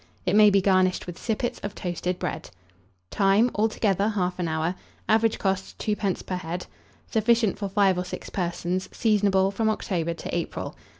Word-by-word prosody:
It 185 +2 +2
may 210 0 +8
be 200 -1 +3
garnished 185 -1 +2
with 175 -2 -8
sippets 235 +1 -2
of 205 - -6
toasted 180 0 -3
bread. 160 - -4 0.6
Time. 200 +5 +3
Altogether, 210 -1 +1
1/2 180 -1 -1
hour. 160 +2 0 0.3
Average 225 0 +3
cost, 190 -1 -2
2d. 210 -3 -1
per 185 - -3
head. 175 +1 -5 0.5
Sufficient 225 -1 +2
for 200 -2 -3
5 195 -2 +3
or - - -1
6 180 - -7
persons. 180 0 -2
Seasonable 200 -3 +2
from 220 +2 0
October 170 -6 -1
to - - -5
April. 170 - -4
195 Hz, 160 wpm, -25 LUFS, 180-210 Hz, 0.6 s, may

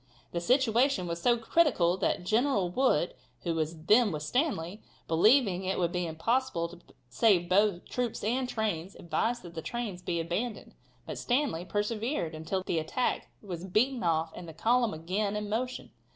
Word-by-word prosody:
The 170 - -2
situation 250 0 +3
was 170 0 -4
so 240 +5 +4
critical 230 - +3
that 180 - 0
General 215 -4 +2
Wood, 250 - +2 0.3
who 170 - 0
was 160 0 -3
then 215 +2 +5
with 150 -2 -4
Stanley, 210 - -1 0.3
believing 195 +2 +4
it 190 +1 -1
would 175 -2 +1
be 180 -1 -1
impossible 170 +1 0
to 175 0 -12 0.3
save 175 - +3
both 190 0 +2
troops 245 -3 -3
and 250 +4 0
trains, 200 -6 -2
advised 225 +9 -1
that 175 -1 -10
the 165 - -5
trains 215 -3 -4
be 175 -2 -2
abandoned. 205 +8 -3 0.3
But - - -6
Stanley 245 - 0
persevered 210 - -2
until 160 +4 -3
the 170 - 0
attack 160 +11 -1 0.2
was 180 -4 -6
beaten 235 +7 +1
off 160 -1 +1
and 170 -2 -8
the - - -9
column 235 +4 +2
again 195 +6 -2
in 210 0 -3
motion. 250 +4 -3
195 Hz, 165 wpm, -30 LUFS, 170-240 Hz, 0.3 s, then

